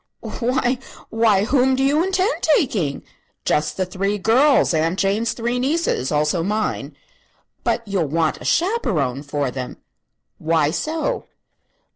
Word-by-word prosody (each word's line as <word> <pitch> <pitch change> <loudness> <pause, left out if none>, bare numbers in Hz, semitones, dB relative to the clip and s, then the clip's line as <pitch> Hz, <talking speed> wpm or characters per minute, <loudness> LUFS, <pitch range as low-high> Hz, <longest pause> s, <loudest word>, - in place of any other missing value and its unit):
"Why 250 +1 +1 0.3
why 220 -3 +3
whom 260 +2 +3
do 265 - 0
you 290 +4 +3
intend 380 +4 0
taking?" 210 - +1 0.4
"Just 150 0 0
the 190 - 0
three 195 +3 -2
girls 250 +5 +4
Aunt 165 +3 +1
Jane's 210 +3 +1
three 240 +1 -2
nieces. 275 - 0
Also 150 +3 +1
mine." 210 +5 -2 0.7
"But 230 - -1
you'll 190 -6 0
want 160 +2 0
a - - -9
chaperone 200 - 0
for 145 -2 -2
them." 125 0 -6 0.6
"Why 155 -2 +2
so?" 315 - -2
210 Hz, 130 wpm, -21 LUFS, 160-265 Hz, 0.7 s, girls